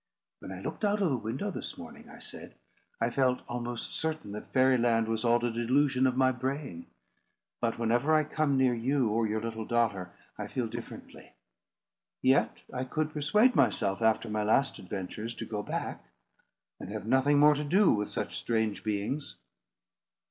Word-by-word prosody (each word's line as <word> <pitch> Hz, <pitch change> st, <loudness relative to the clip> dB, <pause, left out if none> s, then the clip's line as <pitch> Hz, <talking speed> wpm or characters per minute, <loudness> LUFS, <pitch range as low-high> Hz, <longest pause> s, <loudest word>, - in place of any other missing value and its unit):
"When -, -, -9 dB
I -, -, -7 dB
looked -, -, -6 dB
out 210 Hz, 0 st, +2 dB
of 185 Hz, -6 st, +2 dB
the -, -, +2 dB
window 125 Hz, -, -3 dB
this -, -, -6 dB
morning," 235 Hz, -2 st, -11 dB
I 240 Hz, -, -12 dB
said, 245 Hz, -, -9 dB, 0.4 s
"I -, -, +1 dB
felt 130 Hz, -2 st, +1 dB
almost 120 Hz, -1 st, -4 dB
certain 160 Hz, -9 st, -3 dB
that 105 Hz, -, -8 dB
Fairy 130 Hz, -1 st, +4 dB
Land 115 Hz, -1 st, +2 dB
was 110 Hz, 0 st, -1 dB
all 120 Hz, -1 st, +4 dB
a 120 Hz, -, 0 dB
delusion 130 Hz, +3 st, +2 dB
of 125 Hz, 0 st, -1 dB
my 130 Hz, 0 st, +4 dB
brain; 130 Hz, -, -4 dB, 0.7 s
but 115 Hz, -1 st, 0 dB
whenever 120 Hz, +6 st, +1 dB
I 155 Hz, -, +4 dB
come 150 Hz, -2 st, 0 dB
near 130 Hz, -2 st, +4 dB
you 125 Hz, +1 st, +1 dB
or 110 Hz, +1 st, +1 dB
your 110 Hz, +1 st, -1 dB
little 115 Hz, -1 st, -4 dB
daughter, 105 Hz, -6 st, 0 dB, 0.3 s
I -, -, -3 dB
feel 125 Hz, -, -2 dB
differently. 110 Hz, -, -9 dB, 0.9 s
Yet 130 Hz, +1 st, +2 dB
I 125 Hz, -, -2 dB
could 155 Hz, +4 st, -2 dB
persuade 210 Hz, -, +3 dB
myself, 95 Hz, +2 st, +2 dB
after 110 Hz, +1 st, +2 dB
my 105 Hz, 0 st, -1 dB
last 135 Hz, +6 st, +2 dB
adventures, 105 Hz, +5 st, -5 dB
to -, -, -5 dB
go 105 Hz, -2 st, -3 dB
back, -, -, -4 dB, 0.8 s
and -, -, -8 dB
have 105 Hz, -1 st, -5 dB
nothing 130 Hz, +4 st, +3 dB
more 150 Hz, +1 st, +7 dB
to 150 Hz, +1 st, -2 dB
do 185 Hz, +6 st, +4 dB
with 105 Hz, -1 st, 0 dB
such -, -, -3 dB
strange 110 Hz, -3 st, -1 dB
beings." 110 Hz, +7 st, -2 dB
125 Hz, 175 wpm, -30 LUFS, 110-145 Hz, 0.9 s, more